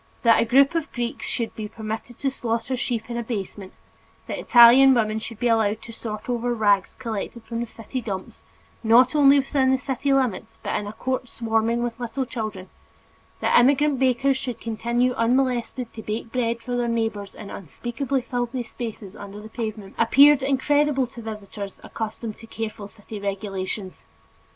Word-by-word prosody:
That 230 Hz, -1 st, +6 dB
a -, -, +2 dB
group 270 Hz, +5 st, +5 dB
of 330 Hz, -2 st, -2 dB
Greeks 240 Hz, -1 st, -3 dB
should 230 Hz, -2 st, -3 dB
be 215 Hz, -1 st, -5 dB
permitted 220 Hz, +2 st, -6 dB
to 275 Hz, -2 st, -1 dB
slaughter 235 Hz, 0 st, -2 dB
sheep 240 Hz, -2 st, -2 dB
in 235 Hz, 0 st, -4 dB
a 235 Hz, -, -2 dB
basement, 200 Hz, -4 st, -5 dB, 0.5 s
that -, -, -4 dB
Italian 255 Hz, +3 st, +8 dB
women 220 Hz, -2 st, +1 dB
should 225 Hz, 0 st, -8 dB
be 245 Hz, -, 0 dB
allowed 220 Hz, -1 st, +2 dB
to 230 Hz, -, -10 dB
sort 215 Hz, -2 st, -6 dB
over 240 Hz, 0 st, -1 dB
rags 205 Hz, -3 st, +2 dB
collected 230 Hz, -1 st, -5 dB
from 230 Hz, 0 st, -5 dB
the 235 Hz, -, -2 dB
city 225 Hz, +3 st, -6 dB
dumps, 195 Hz, -5 st, -6 dB, 0.4 s
not 235 Hz, +3 st, +6 dB
only 285 Hz, -1 st, +6 dB
within 270 Hz, -1 st, +2 dB
the 265 Hz, -, +4 dB
city 270 Hz, +1 st, -2 dB
limits 225 Hz, -5 st, 0 dB
but -, -, -2 dB
in 210 Hz, -, -2 dB
a 205 Hz, -, -6 dB
court 255 Hz, +1 st, -3 dB
swarming 230 Hz, +1 st, 0 dB
with 235 Hz, -1 st, -4 dB
little 245 Hz, +2 st, -3 dB
children, 215 Hz, -6 st, -5 dB, 0.7 s
that -, -, +5 dB
immigrant 280 Hz, +2 st, +3 dB
bakers 265 Hz, +1 st, +2 dB
should 250 Hz, -3 st, -5 dB
continue 235 Hz, +2 st, 0 dB
unmolested 245 Hz, 0 st, 0 dB
to 220 Hz, -, -7 dB
bake 220 Hz, +2 st, -4 dB
bread 235 Hz, -2 st, -1 dB
for 245 Hz, 0 st, -3 dB
their 240 Hz, -1 st, 0 dB
neighbors 225 Hz, -4 st, -2 dB
in 205 Hz, -, -9 dB
unspeakably 240 Hz, -, -3 dB
filthy 245 Hz, 0 st, -2 dB
spaces 220 Hz, -4 st, -7 dB
under 200 Hz, 0 st, -9 dB
the 215 Hz, +1 st, -10 dB
pavement, 215 Hz, -4 st, -5 dB
appeared 280 Hz, +5 st, +6 dB
incredible 280 Hz, +1 st, +2 dB
to 240 Hz, 0 st, -11 dB
visitors 210 Hz, -2 st, -7 dB
accustomed 220 Hz, 0 st, -5 dB
to 225 Hz, -, -13 dB
careful 215 Hz, -2 st, -5 dB
city 210 Hz, +1 st, -10 dB
regulations. 195 Hz, -1 st, -4 dB
235 Hz, 175 wpm, -24 LUFS, 215-255 Hz, 0.7 s, Italian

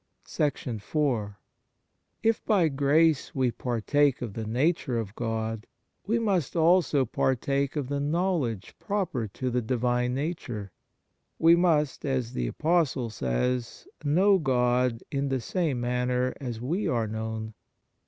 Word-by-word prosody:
IV 120 Hz, -5 st, -1 dB, 0.9 s
IF 225 Hz, -1 st, +2 dB
by 185 Hz, -7 st, +4 dB
grace 145 Hz, +2 st, +2 dB
we 130 Hz, -2 st, +2 dB
partake 130 Hz, +4 st, +1 dB
of 110 Hz, -5 st, -5 dB
the 110 Hz, 0 st, -5 dB
nature 130 Hz, +1 st, +1 dB
of 110 Hz, -3 st, -4 dB
God, 110 Hz, -1 st, -3 dB, 0.4 s
we 225 Hz, +3 st, +2 dB
must 195 Hz, -, 0 dB
also 165 Hz, -4 st, +4 dB
partake 135 Hz, +4 st, 0 dB
of 145 Hz, -4 st, -2 dB
the 140 Hz, +1 st, -2 dB
knowledge 150 Hz, -, -1 dB
proper 190 Hz, -, -2 dB
to 125 Hz, +5 st, -4 dB
the 125 Hz, +1 st, +1 dB
Divine 125 Hz, +1 st, 0 dB
Nature. 125 Hz, -, -4 dB, 0.7 s
We 165 Hz, +1 st, +6 dB
must, 160 Hz, -5 st, +2 dB
as 130 Hz, -4 st, -1 dB
the -, -, -1 dB
Apostle 150 Hz, -, 0 dB
says, 115 Hz, -, -2 dB, 0.2 s
know 185 Hz, +7 st, +4 dB
God 125 Hz, -3 st, +1 dB
in 140 Hz, 0 st, -1 dB
the 135 Hz, -1 st, 0 dB
same 150 Hz, -, -1 dB
manner 125 Hz, +1 st, 0 dB
as 120 Hz, -4 st, -4 dB
we 165 Hz, -, -1 dB
are 115 Hz, -3 st, +1 dB
known. 110 Hz, 0 st, -4 dB
130 Hz, 130 wpm, -27 LUFS, 115-155 Hz, 0.9 s, We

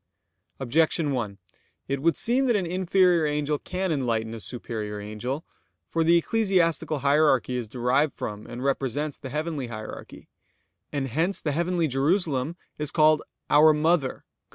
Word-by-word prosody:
Objection 150 Hz, +3 st, +1 dB
1: 110 Hz, -7 st, -3 dB, 0.5 s
It 140 Hz, 0 st, -2 dB
would 165 Hz, +2 st, +2 dB
seem 260 Hz, +3 st, +2 dB
that 240 Hz, -, +3 dB
an 195 Hz, -3 st, +1 dB
inferior 180 Hz, -2 st, +3 dB
angel 150 Hz, 0 st, -1 dB
can 185 Hz, 0 st, -3 dB
enlighten 115 Hz, -6 st, -1 dB
a 115 Hz, -, -6 dB
superior 110 Hz, -3 st, -5 dB
angel. 110 Hz, +8 st, -5 dB, 0.4 s
For 165 Hz, -, +1 dB
the 170 Hz, +1 st, +5 dB
ecclesiastical 170 Hz, -6 st, +1 dB
hierarchy 140 Hz, -3 st, +3 dB
is 120 Hz, -3 st, -3 dB
derived 125 Hz, +5 st, +1 dB
from, 105 Hz, 0 st, -6 dB
and 120 Hz, +2 st, -7 dB
represents 140 Hz, +2 st, -1 dB
the 130 Hz, -, -7 dB
heavenly 150 Hz, -2 st, -3 dB
hierarchy; 110 Hz, -2 st, -9 dB, 0.6 s
and 140 Hz, -2 st, -2 dB
hence 165 Hz, -, 0 dB
the 150 Hz, -, -2 dB
heavenly 170 Hz, +2 st, 0 dB
Jerusalem 145 Hz, +1 st, 0 dB, 0.2 s
is 150 Hz, -1 st, -1 dB
called 155 Hz, 0 st, +4 dB, 0.3 s
"our 155 Hz, +1 st, +7 dB
mother" 150 Hz, -3 st, +2 dB
(Gal. -, -, -18 dB
150 Hz, 150 wpm, -26 LUFS, 125-165 Hz, 0.6 s, our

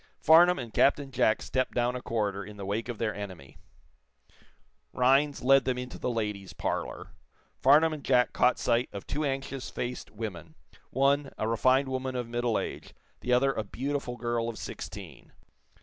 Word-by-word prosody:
Farnum 175 Hz, +3 st, +6 dB
and 120 Hz, -4 st, -6 dB
Captain 140 Hz, 0 st, +3 dB
Jack 110 Hz, -3 st, +2 dB
stepped 130 Hz, -1 st, -1 dB
down 120 Hz, +1 st, +1 dB
a 125 Hz, -, -4 dB
corridor 105 Hz, -4 st, -2 dB
in 105 Hz, +1 st, -11 dB
the 100 Hz, -, -6 dB
wake 110 Hz, +5 st, -2 dB
of 120 Hz, -, -4 dB
their 110 Hz, -1 st, -1 dB
enemy. 95 Hz, -9 st, -9 dB, 1.3 s
Rhinds 135 Hz, +3 st, +3 dB
led 135 Hz, +1 st, +6 dB
them 130 Hz, -1 st, -1 dB
into 125 Hz, 0 st, -6 dB
the -, -, -1 dB
ladies' 105 Hz, -5 st, -3 dB
parlor. -, -, -4 dB, 0.5 s
Farnum 155 Hz, +4 st, +5 dB
and 150 Hz, -3 st, -7 dB
Jack 125 Hz, -2 st, +3 dB
caught 125 Hz, -, +3 dB
sight 120 Hz, 0 st, +1 dB
of 100 Hz, -, -7 dB
two 150 Hz, -, -2 dB
anxious 135 Hz, -1 st, -3 dB
faced 125 Hz, +1 st, -5 dB
women 90 Hz, -8 st, -7 dB, 0.3 s
one, 140 Hz, +2 st, +2 dB
a 110 Hz, -, -1 dB
refined 130 Hz, +4 st, +3 dB
woman 130 Hz, 0 st, -3 dB
of 125 Hz, -2 st, -3 dB
middle 120 Hz, -1 st, 0 dB
age, -, -, -6 dB, 0.2 s
the 125 Hz, -, -3 dB
other 135 Hz, +2 st, +4 dB
a 110 Hz, -, -2 dB
beautiful 130 Hz, +3 st, -4 dB
girl 120 Hz, -1 st, -1 dB
of 115 Hz, -, -6 dB
sixteen. -, -, -8 dB
125 Hz, 170 wpm, -29 LUFS, 110-135 Hz, 1.3 s, Farnum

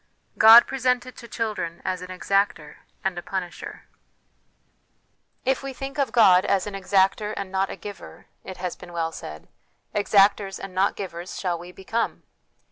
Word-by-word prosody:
God 225 Hz, +2 st, +10 dB
presented 250 Hz, -2 st, -1 dB
to 235 Hz, -, -10 dB
Children 215 Hz, -8 st, -3 dB
as 185 Hz, -1 st, -2 dB
an 180 Hz, -, -7 dB
Exactor 185 Hz, -4 st, -1 dB, 0.3 s
and 190 Hz, -1 st, -1 dB
a -, -, -7 dB
Punisher. 180 Hz, -1 st, -6 dB, 0.8 s
" -, -, -45 dB
If 265 Hz, -, -2 dB
we 275 Hz, -1 st, -6 dB
think 275 Hz, +3 st, -6 dB
of 270 Hz, -5 st, +1 dB
God 190 Hz, -6 st, +6 dB
as 195 Hz, -, +1 dB
an 205 Hz, -, -6 dB
exactor 195 Hz, +2 st, +1 dB
and 195 Hz, -1 st, -5 dB
not 190 Hz, 0 st, 0 dB
a -, -, -5 dB
giver," 205 Hz, -1 st, -10 dB, 0.2 s
it 190 Hz, -, -8 dB
has 180 Hz, -1 st, -4 dB
been 175 Hz, -1 st, -13 dB
well 165 Hz, -1 st, -1 dB
said, 75 Hz, -, -9 dB, 0.2 s
" -, -, -45 dB
exactors 200 Hz, -1 st, +3 dB
and 195 Hz, -1 st, -8 dB
not 190 Hz, +2 st, +1 dB
givers 175 Hz, -2 st, -6 dB
shall 175 Hz, -3 st, -2 dB
we 175 Hz, +1 st, -10 dB
become." 210 Hz, +5 st, -3 dB
195 Hz, 170 wpm, -24 LUFS, 180-220 Hz, 0.8 s, God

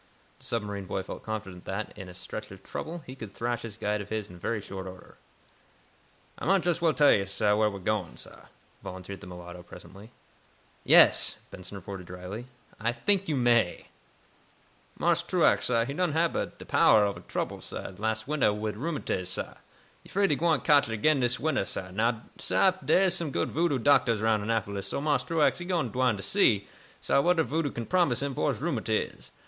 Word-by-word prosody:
The -, -, -12 dB
submarine 105 Hz, -4 st, -3 dB
boy 95 Hz, +1 st, -3 dB
felt -, -, -8 dB
confident 95 Hz, -5 st, -6 dB
that, 100 Hz, +2 st, -4 dB
in 95 Hz, -3 st, -9 dB
a 90 Hz, -, -11 dB
stretch 105 Hz, +3 st, -7 dB
of 95 Hz, 0 st, -12 dB
trouble, 165 Hz, 0 st, -6 dB
he 130 Hz, -, -8 dB
could 115 Hz, -6 st, -8 dB
thrash 120 Hz, +2 st, -2 dB
this 110 Hz, -3 st, -8 dB
guide 105 Hz, -1 st, -1 dB
of 100 Hz, -, -9 dB
his 110 Hz, -3 st, -3 dB
in 90 Hz, -, -12 dB
very 110 Hz, +5 st, -1 dB
short 95 Hz, -2 st, -7 dB
order. 95 Hz, 0 st, -12 dB, 1.2 s
"Ah -, -, -4 dB
might 195 Hz, 0 st, +4 dB
jess 175 Hz, -1 st, 0 dB
well 165 Hz, -2 st, +4 dB
tell 145 Hz, -1 st, +6 dB
yo' 100 Hz, -, +3 dB
wheah 105 Hz, +2 st, +2 dB
we 100 Hz, -, -7 dB
am 95 Hz, -, -12 dB
gwine, 105 Hz, -4 st, -1 dB
sah," -, -, -9 dB, 0.4 s
volunteered 95 Hz, +1 st, -8 dB
the 100 Hz, -, -10 dB
mulatto, 90 Hz, 0 st, -9 dB
presently. 100 Hz, +4 st, -13 dB, 0.7 s
"Yes," -, -, +6 dB
Benson 95 Hz, +2 st, -7 dB
retorted, 95 Hz, -1 st, -8 dB
drily. 90 Hz, +7 st, -7 dB, 0.3 s
"I 115 Hz, +2 st, +1 dB
think 195 Hz, +10 st, +1 dB
you 150 Hz, -, +1 dB
may." 120 Hz, -7 st, +2 dB, 1.1 s
"Marse -, -, +2 dB
Truax, -, -, +2 dB
sah, 115 Hz, 0 st, +2 dB
he 140 Hz, -, -4 dB
done 175 Hz, 0 st, 0 dB
hab 165 Hz, +1 st, +1 dB
er -, -, 0 dB
powah 105 Hz, -2 st, +3 dB
ob 100 Hz, -, -6 dB
trouble, -, -, -3 dB
sah, -, -, -7 dB
las' 110 Hz, 0 st, -1 dB
wintah, 145 Hz, -7 st, +2 dB
wid 105 Hz, 0 st, -3 dB
rheumatiz, 140 Hz, -, -2 dB
sah. 90 Hz, -, -3 dB, 0.5 s
He -, -, -17 dB
'fraid 200 Hz, -2 st, +2 dB
he -, -, +4 dB
gwine 160 Hz, -3 st, +2 dB
cotch 145 Hz, -5 st, +4 dB
it -, -, -2 dB
again 150 Hz, +6 st, +3 dB
dis 125 Hz, -1 st, +1 dB
wintah, 150 Hz, -11 st, 0 dB
sah. 95 Hz, 0 st, -4 dB
Now, 115 Hz, +3 st, 0 dB, 0.2 s
sah, 190 Hz, -, +3 dB
dere 190 Hz, -, +4 dB
am 190 Hz, -, +4 dB
some 170 Hz, -4 st, 0 dB
good -, -, -1 dB
voodoo 165 Hz, -2 st, +1 dB
doctahs 115 Hz, -4 st, +3 dB
'roun' 110 Hz, -2 st, +3 dB
Annapolis, 100 Hz, -2 st, -2 dB
so -, -, -2 dB
Marse 145 Hz, 0 st, +1 dB
Truax, 165 Hz, -1 st, +2 dB
he 175 Hz, -, -6 dB
done 175 Hz, -8 st, 0 dB
gwine 125 Hz, -1 st, +1 dB
to 95 Hz, -, -7 dB
see, 105 Hz, -, +3 dB, 0.3 s
sah, -, -, +2 dB
what 180 Hz, +3 st, +3 dB
er -, -, +5 dB
voodoo 155 Hz, 0 st, -1 dB
can 120 Hz, -3 st, -5 dB
promise 170 Hz, -7 st, +2 dB
him 140 Hz, -1 st, -2 dB
fo' 80 Hz, -, 0 dB
his -, -, -3 dB
rheumatiz. -, -, -2 dB
110 Hz, 200 wpm, -28 LUFS, 100-145 Hz, 1.2 s, tell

